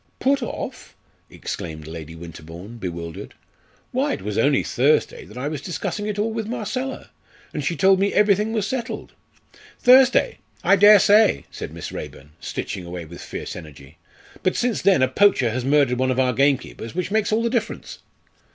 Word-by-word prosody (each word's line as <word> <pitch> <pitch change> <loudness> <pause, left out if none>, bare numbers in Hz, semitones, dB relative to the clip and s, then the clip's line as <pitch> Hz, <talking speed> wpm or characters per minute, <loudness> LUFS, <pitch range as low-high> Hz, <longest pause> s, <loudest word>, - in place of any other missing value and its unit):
"Put 275 +1 +1
off!" 240 - -6 0.3
exclaimed 80 -2 -6
Lady 80 0 -8
Winterbourne, 85 +6 -10
bewildered. 85 -5 -6 0.6
"Why - - 0
it - - -6
was 105 0 -3
only 140 +5 +3
Thursday 140 +5 +1
that 105 - -13
I 130 +3 -3
was 150 -2 -4
discussing 205 +4 -4
it 210 -1 -3
all 215 +2 0
with 220 -2 -3
Marcella, 255 +3 -4 0.4
and 150 - -3
she 170 +4 -1
told 190 +1 +4
me 200 +1 +2
everything 210 +1 +3
was 215 -3 0
settled." 240 +1 -4 0.7
"Thursday! 260 - +5 0.2
I 200 - +5
dare 205 +2 +8
say!" 205 - +4
said - - -7
Miss - - -7
Raeburn, 75 +2 -8
stitching 95 - -5
away 85 -1 -7
with 85 +2 -11
fiery - - -6
energy, 75 -5 -12 0.4
"but 185 - +1
since 240 -2 0
then 190 -9 +4
a - - +4
poacher 130 - +3
has 125 +2 -2
murdered 135 -2 +2
one 130 0 +1
of 130 0 0
our 130 -1 +2
gamekeepers, 135 -2 0
which 180 +1 -2
makes 215 -1 +1
all 220 +2 +2
the 235 - +1
difference." 235 -3 -3
145 Hz, 175 wpm, -22 LUFS, -, 0.7 s, dare